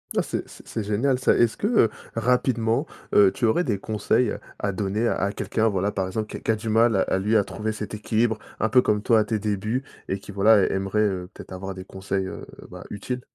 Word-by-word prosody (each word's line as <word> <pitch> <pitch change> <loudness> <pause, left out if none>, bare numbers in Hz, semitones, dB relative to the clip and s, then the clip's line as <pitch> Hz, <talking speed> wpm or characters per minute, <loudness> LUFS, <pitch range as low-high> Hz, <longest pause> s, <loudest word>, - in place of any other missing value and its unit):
Ouais, - - +2
c'est - - -4
c'est 115 - -6
génial, 125 +6 +1
ça. 130 - +3
Est-ce 120 -2 +3
que, 205 - -1
heu, 220 - +4 0.3
rapidement, 115 -1 +1 0.3
heu, 100 -2 +6
tu 125 +1 -1
aurais 115 +11 +3
des 110 - 0
conseils 110 +3 0 0.2
à 100 - -1
donner 105 +4 -1
à 100 +1 0
quelqu'un, 110 +1 0
voilà, 100 0 0
par 95 -2 -2
exemple, 110 +3 -3
qui - - -5
a - - -9
qui - - -8
a 110 - +4
du 110 +1 -5
mal 110 -2 +4
à 95 - +1
lui, 105 +4 +1
à 105 - +3
trouver 110 +2 -4
cet 105 0 -6
équilibre, 110 +1 0 0.2
un 110 - +1
peu 125 - +6
comme 105 -3 0
toi 115 0 +4
à 110 - +3
tes 110 0 -1
débuts 110 +5 -2 0.2
et 95 - -1
qui 100 - -10
voilà 100 +1 +5
aimerait, 95 +2 0
heu, 95 -3 -1
peut-être - - -11
avoir 95 +1 -6
des 95 0 -8
conseils, 95 0 -3
heu, 95 - -7 0.3
bah, - - -9
utiles? 125 +5 -4
105 Hz, 235 wpm, -24 LUFS, 100-115 Hz, 0.3 s, heu